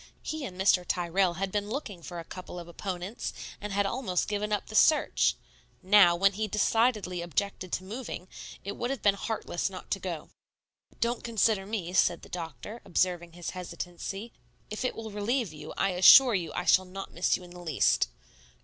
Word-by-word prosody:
He 315 -1 -4
and 185 -6 -8
Mr. 190 -1 +4
Tyrrell 175 +1 +1
had 190 +2 -2
been 205 0 -2
looking 215 - -5
for 175 +1 -8
a - - -6
couple 180 -1 -8
of 170 -1 -7
opponents, 185 +4 -5 0.3
and 210 0 -5
had 200 0 +1
almost 195 -5 -1
given 210 0 -2
up 210 - 0
the - - -11
search. 305 +7 +4 0.5
Now, 185 -2 +7
when 195 +3 +3
he 215 +2 -2
decidedly 210 -3 +1
objected 185 +1 -2
to 185 - -1
moving, 210 -3 -6 0.4
it 200 +1 -5
would 240 - -2
have 270 -3 -3
been 205 - +5
heartless 200 -3 -3
not 185 -1 -10
to 195 - 0
go. 175 -5 -5 0.7
"Don't 235 +1 0
consider 220 -4 +1
me," 195 -5 -3
said 175 -1 +3
the - - -12
doctor, 170 - -7
observing 175 -1 0
his 175 0 -5
hesitancy. 185 +4 -6 0.4
"If 215 - -3
it 255 - -1
ill 220 -1 -6
relieve 210 - -1
you, 155 0 -9
I 195 - +2
assure 235 +8 +8
you 175 -5 -1
I 180 - -2
shall 185 0 +5
not 195 +1 -8
miss 175 - +2
you 185 - -13
in 175 - -13
the 180 - -11
least." 150 - +2
195 Hz, 190 wpm, -29 LUFS, 175-215 Hz, 0.7 s, assure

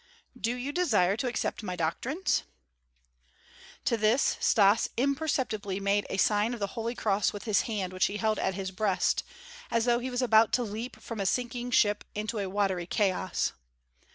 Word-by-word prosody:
"Do 235 +2 -2
you 255 +3 -4
desire 215 - +2
to 250 - -1
accept 240 -2 -2
my 185 -4 -4
doctrines?" 235 - -1 1.4
To 235 - +2
this 220 +5 +3
Stas 205 0 +4
imperceptibly 255 -8 -1
made 200 0 +1
a - - -2
sign 210 +4 +2
of - - -10
the 200 - 0
holy 230 +1 -3
cross 205 -3 +1
with 205 - -7
his 215 -3 +2
hand 195 -4 -2
which 185 - +2
he 200 - -4
held 215 -1 0
at 190 - 0
his 190 -1 -4
breast, 195 -1 +1 0.5
as 230 0 +1
though 240 -1 +3
he 255 +1 -4
was 250 0 -1
about 225 -2 +5
to 250 - +2
leap 225 +3 -6
from 230 -2 -7
a 195 - 0
sinking 245 +2 -1
ship 210 -3 +3
into 215 +1 -3
a 195 -2 -2
watery 190 -3 0
chaos. 190 -2 0
215 Hz, 180 wpm, -29 LUFS, 200-240 Hz, 1.4 s, about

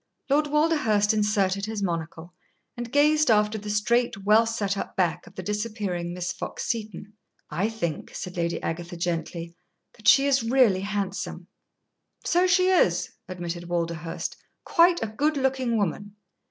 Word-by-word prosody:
Lord 295 +2 +3
Walderhurst 290 -9 +2
inserted 205 -2 +1
his 220 -2 -3
monocle 165 -1 -4 0.4
and 240 -1 -6
gazed 300 +1 +4
after 210 0 +3
the 210 +1 -7
straight, 210 0 +1
well 220 +2 +5
set 205 -3 -1
up - - -5
back 180 -3 0
of - - -15
the 185 - -6
disappearing 210 -4 -3
Miss 180 0 -3
Fox - - -6
Seton. 210 -2 -4 0.4
"I 200 +5 0
think," 170 -9 -4
said 180 - -6
Lady 170 -1 -1
Agatha, 175 +1 -4
gently, 170 0 -3 0.4
"that 215 -2 -8
she 275 +5 +7
is 275 -2 +3
really 230 -4 +3
handsome." 200 -1 -3 0.8
"So 360 +1 +3
she 370 0 +4
is," 370 - +2 0.2
admitted 175 -1 -6
Walderhurst 170 -1 -3 0.3
"quite 345 -2 +4
a - - -1
good 290 +8 0
looking 260 -3 0
woman." 205 +1 -2
210 Hz, 150 wpm, -26 LUFS, 180-240 Hz, 0.8 s, she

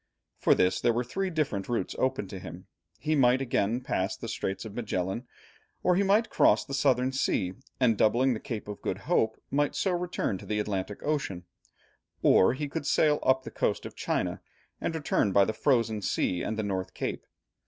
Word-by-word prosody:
For - - +4
this, 90 0 +2
there 120 - +3
were 120 +2 0
three 190 +10 -2
different 140 - -2
routes 120 - -1
open 130 -6 0
to 95 - -7
him: 85 +1 -9 0.3
he 155 +1 -1
might 130 -3 +4
again 120 -2 0
pass 95 -5 -1
the 115 - -7
Strait 95 -3 -3
of 110 - -7
Magellan, 105 0 -3 0.6
or 180 - +4
he 190 - +3
might 205 +3 +3
cross - - +4
the 140 - -7
Southern 130 -2 +2
Sea, 95 -8 0 0.3
and 115 -5 +3
doubling 125 +4 +4
the 110 - -4
Cape 110 -2 -6
of 105 -1 -7
Good - - -2
Hope 110 0 +1
might 145 +1 +1
so 190 - +1
return 175 - -1
to - - -11
the 105 0 -1
Atlantic 100 -1 -3
Ocean, 140 -13 -2 0.8
or 95 - +5
he 145 +2 -3
could 145 0 -4
sail 150 -1 +3
up 130 0 +3
the - - -8
coast - - -1
of - - -8
China - - -2 0.4
and 165 - -2
return 145 -9 +1
by 100 0 +6
the 110 - -2
Frozen 115 -4 +1
Sea 90 -2 0
and 110 - -3
the 110 - -1
North 95 -3 -3
Cape. - - -4
120 Hz, 195 wpm, -28 LUFS, 100-140 Hz, 0.8 s, by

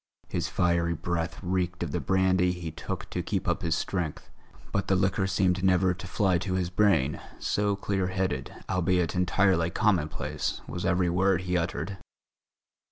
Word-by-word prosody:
His - - -1
fiery 85 -1 +1
breath 85 0 -2
reeked 90 -1 -1
of - - -4
the - - -1
brandy 95 -1 +2
he 85 -2 -5
took - - -5
to - - -1
keep - - -2
up - - +1
his 80 -1 +1
strength; 85 -2 -3 0.4
but 100 - -1
the 95 - +3
liquor 95 +1 +1
seemed 95 -1 +1
never 95 -1 +4
to 90 - -9
fly 95 -5 +2
to 95 0 -2
his 90 -1 -1
brain, 90 -8 +2 0.2
so 105 -1 0
clear 100 -2 -1
headed, 95 -1 -2 0.2
albeit 90 -2 +1
entirely 90 -1 +2
commonplace, 90 -6 0
was 90 - -4
every 90 -1 +2
word 90 0 +2
he 90 0 -2
uttered. 85 +2 -2
90 Hz, 165 wpm, -28 LUFS, 85-95 Hz, 0.4 s, never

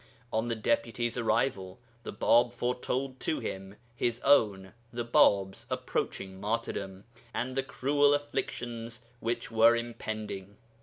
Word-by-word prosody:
On 110 +2 +1
the 115 - 0
Deputy's 115 +1 0
arrival 110 -5 0 0.2
the - - -6
Bāb 120 +3 +4
foretold 125 +2 -2
to 155 - -1
him 95 +1 -5 0.2
his 120 0 0
own 100 -9 +3 0.2
(the 120 0 -3
Bāb's) 100 -4 +3
approaching 95 0 -3
martyrdom 100 -3 -3 0.3
and 130 +1 -2
the 135 - +2
cruel 145 +2 +3
afflictions 120 -4 -4
which 115 0 -2
were 115 +1 +6
impending. 110 -4 -5
115 Hz, 120 wpm, -30 LUFS, 105-125 Hz, 0.3 s, were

